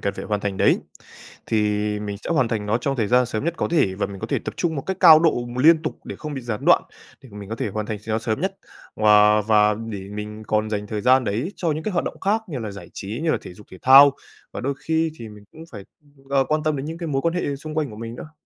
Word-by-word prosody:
cần 100 - -2
phải - - -7
hoàn 105 -1 -2
thành 100 -2 -3
đấy, - - +3 0.7
thì 110 - +1 0.4
mình 105 -1 -5
sẽ - - -5
hoàn 130 -8 +2
thành 105 -3 -3
nó 110 +3 +1
trong 135 +2 -2
thời 110 -3 0
gian 125 0 +4
sớm 110 +1 -4
nhất 170 +1 -1
có - - -1
thể, 145 - +2
và 100 +1 -2
mình 100 -1 -9
có - - -4
thể - - -1
tập - - -5
trung 165 -2 -1
một 135 - -3
cách 190 -1 -2
cao 160 -4 +9
độ 155 -7 +2
mà 125 +2 -4
liên 160 0 +6
tục 155 - -4
để - - -7
không 150 -2 -6
bị 135 - -4
gián 115 -3 -4
đoạn, - - +5 0.4
để 130 - -14
mà 105 - -9
mình 100 -1 -9
có 115 - -4
thể - - -2
hoàn 105 +1 -4
thành 105 -2 -4
s 110 - -18
nó 110 - +1
sớm 110 -1 -2
nhất - - -2 0.4
và 105 0 +5
và 105 0 +3
để 105 -3 -7
mình 105 +1 -7
còn 110 0 0
dành 105 -1 -3
thời 105 0 -4
gian 130 +2 +4
đấy 120 - -2
cho 165 -3 0
những 155 +1 -4
cái 215 - -2
hoạt 175 - 0
động - - -6
khác 215 +3 +1
như 140 -6 -4
là 110 -3 -5
giải 100 - -11
trí, 105 +7 -6
như 165 - +1
là - - +1
thể 90 - -11
dục 105 +1 -16
thể 95 - -12
thao, 135 +2 +8 0.4
và - - -5
đôi 140 +2 -2
khi 160 0 -1
thì 115 - -8
mình 105 -1 -14
cũng 160 - -14
phải, 100 -4 -9 0.5
ờ, 135 -1 +3
quan 155 0 +1
tâm 155 -2 0
đến 135 +2 -5
những 165 +1 -6
cái 170 - -5
mối 135 -3 -1
quan 170 +1 0
hệ 145 -6 -2
xung 155 +2 -8
quanh 150 -6 -1
của 105 - -10
mình 115 +1 -7
nữa. 155 +5 -10
120 Hz, 300 wpm, -22 LUFS, 105-155 Hz, 0.7 s, cao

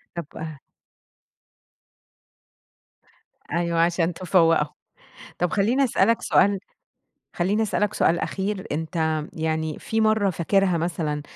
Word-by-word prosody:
طب 160 -2 -7 2.9
أيوه، 170 0 0
عشان 170 0 +2
تفَوّقُهم. 165 -4 +3 0.7
طب 180 0 0
خليني 230 +7 +2
أسألك 230 -2 +2
سؤال 200 -1 +3 0.8
خليني 195 +5 +1
أسألك 210 0 0
سؤال 170 +1 +2
أخير، 195 0 -3
أنت 160 0 -1
يعني 160 -1 -2
في 225 0 -1
مرّة 215 -2 +3
فاكرها 185 +1 +1
مثلًا، 160 -3 -2
175 Hz, 95 wpm, -24 LUFS, 160-200 Hz, 2.9 s, تفَوّقُهم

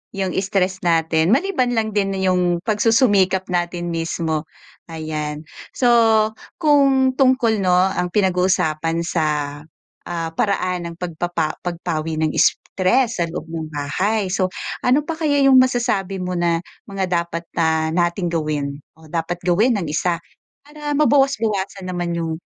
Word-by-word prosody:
'yung 190 -2 -2
stress 190 -1 0
natin, 165 -1 +2
maliban 260 - +1
lang 220 -1 0
din 195 -1 0
'yung 180 -2 +1
pagsusumikap 205 -4 +3
natin 175 0 -2
mismo, 165 -1 -2 0.4
ayan. 155 -2 -4 0.3
So, 225 -4 +4 0.3
kung 275 -4 +3
tungkol 255 -5 +2
'no, 180 -1 +3
ang 180 -1 +1
pinag-uusapan 180 -4 +1
sa, 165 -2 0 0.8
ah, 165 -1 -3
paraan 180 -2 -1
ng 170 - -10
pagpapa 170 -2 -3
pagpawi 165 -2 -3
ng 155 -1 +1
stress 230 +4 +1
sa - - +2
loob 165 -1 -6
ng 160 -1 -4
bahay, 185 +8 -1
so 185 0 +1 0.4
ano 265 +4 +3
pa 330 - -3
kaya 285 -3 +2
'yung 270 -1 +7
masasabi 235 -7 +1
mo 180 0 -3
na 170 -1 +1 0.3
mga 195 -1 -2 0.2
dapat 170 0 -6
na 160 -1 +1
nating 175 +1 0
gawin 150 -3 -2 0.2
o 160 - -18
dapat 170 +1 -2
gawin 205 +8 +3
ng 195 -5 -2
isa 170 +2 0 0.5
para 295 0 -6
mabawas-bawasan 225 -10 +1
naman 175 -1 -2
'yung 165 -1 -2
185 Hz, 135 wpm, -20 LUFS, 165-225 Hz, 0.8 s, yung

